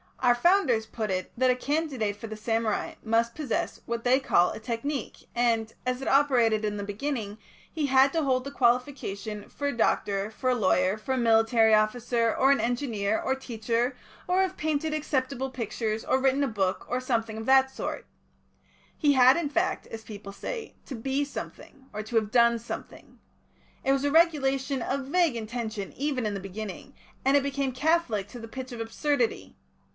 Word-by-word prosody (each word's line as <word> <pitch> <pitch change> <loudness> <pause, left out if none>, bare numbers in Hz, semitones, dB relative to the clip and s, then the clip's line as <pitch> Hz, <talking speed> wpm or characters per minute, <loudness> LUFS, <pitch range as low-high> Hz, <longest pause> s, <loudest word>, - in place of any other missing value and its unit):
Our 245 -2 +4
Founders 260 - +3
put 220 -1 -4
it 185 0 -2
that 255 +1 +3
a - - +1
candidate 265 -6 -1
for 210 +2 -8
the 215 - -6
samurai 225 0 -1
must 230 +1 +1
possess 295 -7 -2
what 235 0 -3
they 255 +2 +4
called 180 -9 +2
a - - -7
Technique, 235 +4 -4
and, 230 -2 +1
as 255 +1 -1
it - - -5
operated 245 -6 +3
in 210 0 -2
the 205 - -4
beginning, 210 0 -4 0.3
he 310 -3 -1
had 265 +1 +5
to 325 -2 +1
hold 255 -2 +1
the 280 - -6
qualification 235 -5 -1
for 285 - -3
a 280 - -2
doctor, 200 -2 +1
for 255 +3 -1
a - - +2
lawyer, 185 -3 +2
for 240 +5 -3
a - - 0
military 225 -1 +4
officer, 230 +2 +2
or 270 +1 +4
an 280 - +3
engineer, 230 -4 0
or 265 - 0
teacher, 240 0 -2 0.3
or 365 +1 +3
have 380 -1 -1
painted 310 0 -1
acceptable 265 -3 -1
pictures, 220 -3 -3
or 260 - +2
written 270 +1 +2
a - - +1
book, 195 -5 -1
or 250 - -1
something 230 -4 -1
of 220 - -5
the 265 +1 +6
sort. 265 - -5 0.9
He 295 -3 +3
had, 260 +1 +6
in 330 -4 -1
fact, 290 - 0
as 225 0 -8
people 205 -2 -9
say, 460 - -6
to 270 - -6
'be 270 +5 -1
something,' 275 -1 -9
or 210 - -3
to 220 +2 -7
have 215 -2 +2
'done 235 0 +5
something.' 230 +1 -9 0.6
It 270 - +2
was 275 0 +1
a 285 - +1
regulation 275 -5 +2
of 270 +2 -2
vague 335 -3 +2
intention 220 -2 -4
even 275 -4 -2
in 210 - -1
the - - -3
beginning, 195 +6 -7 0.3
and 270 +2 +4
it 280 - +1
became 275 -1 -1
catholic 260 - +1
to 245 - -9
the 225 - -8
pitch 260 +2 -7
of 240 - -7
absurdity. 245 +2 -1
245 Hz, 190 wpm, -27 LUFS, 220-275 Hz, 0.9 s, the